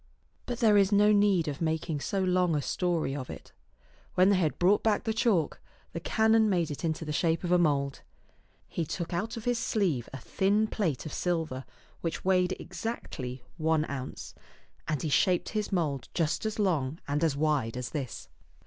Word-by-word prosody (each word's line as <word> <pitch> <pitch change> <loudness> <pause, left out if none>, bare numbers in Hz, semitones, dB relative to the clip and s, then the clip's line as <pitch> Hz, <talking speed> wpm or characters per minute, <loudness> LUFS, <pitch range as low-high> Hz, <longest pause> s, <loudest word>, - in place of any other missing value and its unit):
But 245 -1 -4
there 215 -3 +6
is 200 0 +4
no 205 +1 +5
need 200 -5 +3
of 145 +1 -4
making 160 -1 -1
so 195 +6 -1
long 180 -2 +2
a 145 - +1
story 170 -6 -1
of 130 -3 -5
it. - - -9 0.6
When 185 +2 +5
they 200 - +5
had 160 -5 0
brought 190 +4 +4
back 215 -2 +1
the 220 - -1
chalk, 215 -8 +1 0.3
the 165 - -3
canon 220 +4 +3
made 175 -5 +1
it 145 - -6
into 160 0 -1
the 150 - -3
shape 165 +2 +1
of 175 - -2
a 180 - +5
mould. 140 -4 +1 0.7
He 170 - -2
took 170 +2 -4
out 220 +7 -2
of 225 - -7
his 245 -1 +1
sleeve 175 - 0
a 135 - -6
thin 200 - +1
plate 175 - -2
of 155 - -6
silver 160 -7 -2 0.4
which 165 +1 -3
weighed 185 0 +3
exactly 130 - -5
one 160 -1 +1
ounce, 135 -2 -6 0.5
and 150 -3 -1
he 155 - -1
shaped 180 +4 +2
his 215 -2 -2
mould 150 -8 -1
just 165 +5 0
as 215 - -4
long 165 -7 0
and 145 +2 0
as 150 -4 +1
wide 145 -6 0
as 125 -1 -4
this. 135 -6 -5
170 Hz, 190 wpm, -29 LUFS, 150-200 Hz, 0.7 s, there